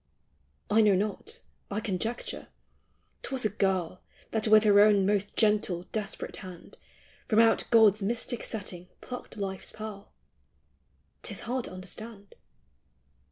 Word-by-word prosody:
I 215 +2 +4
know 210 -3 +5
not; 215 - -3 0.3
I 205 - -2
conjecture. 220 +3 -3 0.7
'T - - -6
was 260 -4 +1
a - - +3
girl 185 -3 -1 0.3
That 220 0 0
with 215 0 +7
her 205 -1 +6
own 205 -2 +6
most 205 0 0
gentle 210 -5 +2
desperate 210 -2 -4
hand 185 -3 -11 0.5
From 215 - +1
out 225 0 +5
God's 220 -3 +6
mystic 230 +3 -1
setting 185 -4 -5
plucked 250 -3 -8
life's 190 -2 -5
pearl— 215 -2 -8 1.1
'T - - -3
is - - -5
hard 250 +1 -2
to - - -7
understand. 200 +3 -8
210 Hz, 135 wpm, -29 LUFS, 195-220 Hz, 1.1 s, with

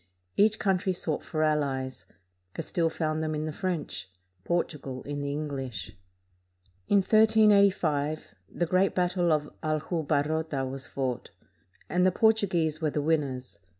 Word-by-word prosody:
Each 215 +1 +4
country 190 -2 +1
sought 160 -4 -2
for 155 -1 -2
allies. 140 -4 -1 0.5
Castile 165 -2 0
found 155 -1 -1
them 155 -1 -1
in 150 +1 -2
the 155 - -3
French; 165 - -3 0.3
Portugal 145 -5 -2
in 145 0 -4
the 140 0 -2
English. 135 -7 -4 0.9
In 200 -1 +4
1385 200 - +3 0.2
the 175 - -1
great 185 +3 +2
battle 180 -1 +2
of 150 -1 0
Aljubarrota 155 -2 -1
was 135 0 -6
fought, 130 -3 -3 0.6
and 180 0 +1
the 185 - +5
Portuguese 180 -8 +2
were 155 - +1
the 150 - -2
win 155 +1 +2
ners. 130 -3 -7
155 Hz, 135 wpm, -28 LUFS, 145-180 Hz, 0.9 s, the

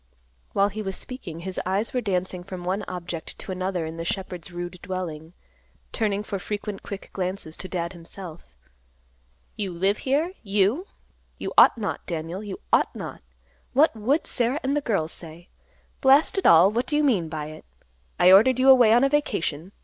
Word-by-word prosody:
While 200 +1 +3
he 215 +2 -5
was 195 -2 -4
speaking, 195 -11 -6
his 190 +1 -4
eyes 195 +4 -1
were 250 - 0
dancing 185 -3 -2
from 185 -1 -7
one 185 +3 -1
object 175 -2 -6
to - - -7
another 185 -2 -2
in 160 +1 -6
the 165 - -4
shepherd's 180 -1 -4
rude 175 +1 -6
dwelling, 170 -3 -5 0.6
turning 210 -3 -1
for 200 -2 -4
frequent 205 +1 -5
quick 200 -1 -8
glances 185 -3 -2
to 185 - -6
Dad 175 -1 -3
himself. 170 0 -10 1.1
"You 200 -3 -3
live 190 +4 +1
here, 300 +7 0
you? 210 - +1 0.5
You - - -5
ought - - +7
not, 215 -2 -3
Daniel, 170 +3 -4
you 200 -3 -6
ought - - +3
not. - - -7 0.5
What 290 0 +4
would 260 +9 +1
Sarah 250 +3 +1
and 270 +2 0
the 295 - +1
girls 195 - -1
say? 170 +1 -10 0.5
Blast 280 +7 +5
it - - +2
all; 170 +4 +7
what 235 +3 -1
do 295 - -1
you 300 - +2
mean 200 - +2
by 155 -1 -5
it? 155 - -11 0.6
I 180 - +7
ordered 225 +7 +7
you 260 +1 +4
away 245 -4 +7
on 240 +3 +5
a 275 - +4
vacation. 185 - -1
195 Hz, 180 wpm, -25 LUFS, 175-230 Hz, 1.1 s, ought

